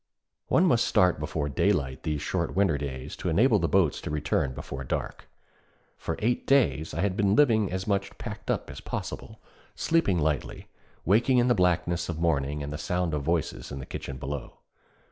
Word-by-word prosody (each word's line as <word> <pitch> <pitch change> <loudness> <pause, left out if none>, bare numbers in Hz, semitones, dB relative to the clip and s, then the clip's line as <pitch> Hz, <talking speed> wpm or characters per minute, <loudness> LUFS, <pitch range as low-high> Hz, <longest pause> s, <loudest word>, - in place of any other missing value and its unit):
One - - +4
must - - +3
start 90 -4 +3
before 75 -1 -2
daylight 65 -1 0
these 75 -2 -2
short 85 0 -2
winter 95 -5 +3
days 70 0 -5
to 90 - -2
enable 105 +6 +4
the 85 - +1
boats 85 -1 +2
to - - -5
return 70 -3 -1
before 70 -1 -6
dark. 65 - -4 0.7
For - - -4
eight 120 +3 -1
days 80 - +2
I 85 - -1
had 95 -1 0
been 100 -1 +2
living 110 -9 +4
as 95 0 -3
much 100 -2 -1
packed - - -7
up - - -1
as - - -9
possible, - - -6 0.4
sleeping 160 - +2
lightly, 75 -3 -2 0.4
waking 120 - +4
in 125 0 +4
the - - +5
blackness 90 -2 +1
of 85 - -3
morning 75 -3 0
at 70 - -5
the 75 - -5
sound 90 +2 -1
of 75 - -1
voices 80 +3 -2
in 70 - -5
the 65 - -6
kitchen 70 - -6
below. 70 +1 -6
85 Hz, 185 wpm, -27 LUFS, 75-100 Hz, 0.7 s, the